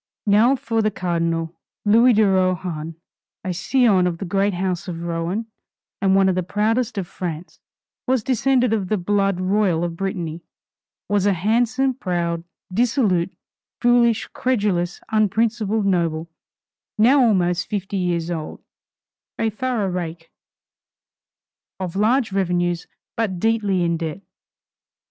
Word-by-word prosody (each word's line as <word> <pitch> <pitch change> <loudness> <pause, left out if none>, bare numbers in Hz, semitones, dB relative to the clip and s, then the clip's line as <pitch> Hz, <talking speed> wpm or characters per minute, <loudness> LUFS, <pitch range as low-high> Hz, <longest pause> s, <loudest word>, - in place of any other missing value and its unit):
Now 220 +6 +4
for 230 -3 -1
the 215 - +2
Cardinal. 170 -3 -2 0.3
Louis 230 +4 +5
de 215 -1 +4
Rohan, 180 -4 0 0.5
a 185 - -2
scion 195 0 +3
of 170 -2 -2
the 195 - -5
great 195 +1 0
house 180 -1 -2
of 170 -2 -5
Rohan, 170 +6 -2 0.5
one 195 -1 +3
of 190 - +3
the 185 - 0
proudest 220 +5 0
of 195 - -1
France, 175 -2 -6 0.5
was 255 -3 +1
descended 255 -1 +2
of 200 -4 -1
the 215 - +1
blood 195 0 0
royal 185 -3 +1
of 170 -1 -3
Brittany; 170 -3 -4 0.7
was 205 -1 +1
a 200 - +4
handsome, 240 +8 +1
proud, 170 -7 -2 0.3
dissolute, 215 -6 +1 0.4
foolish, 240 -2 +3
credulous, 200 -8 0
unprincipled 220 0 +1
noble, 170 -4 0 0.7
now 255 +5 +5
almost 180 -5 +2
fifty 200 -1 -3
years 175 -2 -1
old, 160 -3 -5 0.7
a 225 -1 0
thorough 240 -1 -1
rake, 170 -2 -5 1.5
of 185 -2 -4
large 225 +3 +2
revenues, 175 -2 0 0.3
but 220 -6 -1
deeply 205 -4 +1
in 170 -1 +1
debt. 165 +3 -5
195 Hz, 125 wpm, -21 LUFS, 175-220 Hz, 1.5 s, Louis